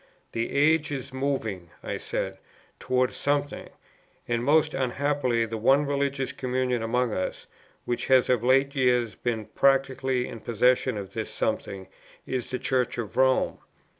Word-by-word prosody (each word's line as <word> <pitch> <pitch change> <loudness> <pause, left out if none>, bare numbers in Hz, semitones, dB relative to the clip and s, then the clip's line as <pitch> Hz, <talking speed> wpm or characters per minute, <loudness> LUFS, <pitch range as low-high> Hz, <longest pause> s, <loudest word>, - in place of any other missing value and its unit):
"The 115 0 -2
age 150 +2 +3
is 135 -1 -5
moving," 115 -10 -2
I - - -4
said, - - -4 0.4
"towards 130 0 0
something; 145 0 -1 0.6
and 120 0 0
most 155 +3 +3
unhappily 130 -2 0
the 115 0 -5
one 135 +6 +4
religious 140 -1 -1
communion 125 -1 -1
among 120 0 0
us, 95 - -3 0.4
which 120 0 -2
has 130 -2 +5
of 125 -3 +2
late 135 +2 +3
years 125 -4 +2
been 115 -3 -3
practically 130 -1 +1
in 115 - -8
possession 125 +2 +2
of 100 -1 -7
this - - -4
something, 95 -1 -3 0.4
is 130 -2 -3
the 130 - -2
Church 125 -1 0
of 110 -3 -5
Rome. 130 0 +2
130 Hz, 145 wpm, -26 LUFS, 120-135 Hz, 0.6 s, has